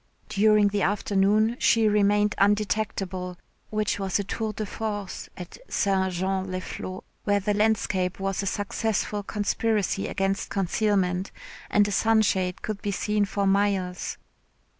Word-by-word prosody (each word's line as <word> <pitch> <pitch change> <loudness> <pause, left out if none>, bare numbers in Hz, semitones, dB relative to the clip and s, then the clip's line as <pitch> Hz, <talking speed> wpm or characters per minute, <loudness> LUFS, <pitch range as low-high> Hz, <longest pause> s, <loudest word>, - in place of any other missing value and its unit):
During 210 0 +4
the 200 0 -1
afternoon 205 +3 +2
she 225 -2 +4
remained 210 0 +3
undetectable, 200 -3 0 0.3
which 215 -1 -1
was 190 -2 0
a 200 - -1
tour 220 +2 -3
de 215 +1 -4
force 205 -1 -5
at 180 -1 -9
St. 190 -1 +1
Jean 190 +1 -1
les 185 0 -2
Flots, 185 +1 -7 0.2
where 205 -1 +3
the 205 +1 0
landscape 200 -4 +1
was 195 0 -1
a 195 - -3
successful 205 +1 -1
conspiracy 205 -1 0
against 195 +1 -1
concealment, 195 -1 0 0.4
and 205 0 +4
a - - -3
sunshade 195 -4 +2
could 215 -2 -4
be 205 - -2
seen 210 +1 +1
for 200 0 -1
miles. 195 -2 0
200 Hz, 140 wpm, -26 LUFS, 190-210 Hz, 0.4 s, During